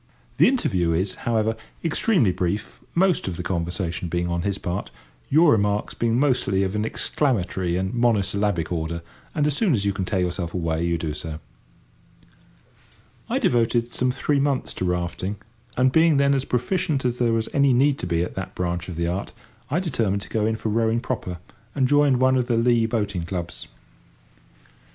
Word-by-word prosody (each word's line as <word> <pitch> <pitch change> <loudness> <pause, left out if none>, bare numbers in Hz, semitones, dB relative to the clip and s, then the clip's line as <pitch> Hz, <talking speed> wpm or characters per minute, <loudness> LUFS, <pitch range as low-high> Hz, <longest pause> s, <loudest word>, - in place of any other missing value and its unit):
The - - +6
interview 95 - +1
is, 95 +3 0 0.2
however, 110 -1 +1 0.3
extremely 165 - +2
brief, 90 +4 -3 0.2
most 185 - +2
of 90 -3 -3
the 90 - -4
conversation 85 0 -2
being 85 +1 -1
on 85 0 -1
his 100 +2 -1
part, 90 +2 -4 0.4
your 155 +2 +5
remarks 105 -1 +1
being 115 0 0
mostly 125 -9 +2
of 95 +1 -2
an 105 +1 0
exclamatory 95 - -1
and 95 +3 -2
mono 120 -3 +3
syllabic 100 -3 -1
order, 85 0 -3 0.3
and 150 - +2
as 150 -2 +2
soon 190 -1 +2
as 100 -5 +1
you 100 - +1
can 95 - -3
tear 95 +1 -1
yourself 90 -1 -2
away 80 -2 -1
you 85 0 +1
do 80 -2 -3
so. 75 +1 -5 1.9
I - - +1
devoted 120 0 +2
some 125 +1 0
three 140 +3 0
months 140 -2 0
to 95 - -3
rafting, 90 +2 -2 0.4
and, 130 +1 +4
being 160 0 +4
then 140 0 +4
as 135 -1 0
proficient 135 +2 0
as 125 0 0
there 120 -2 +2
was 115 0 0
any 140 -1 +4
need 135 +3 +3
to - - -3
be 85 -1 +1
at - - -5
that 95 - -6
branch 90 0 -2
of 85 - -6
the 85 +1 -1
art, 90 +4 -3 0.4
I 150 +6 +1
determined 110 - -1
to - - -11
go 110 -1 0
in 110 - 0
for 110 - -3
rowing 115 +1 +1
proper, 100 -8 -4 0.4
and 135 -3 +2
joined 145 -2 +4
one 130 0 +4
of 125 -1 0
the 120 - +1
Lea 115 -1 +3
boating 105 -5 -1
clubs. 85 -1 -5
105 Hz, 190 wpm, -24 LUFS, 90-130 Hz, 1.9 s, The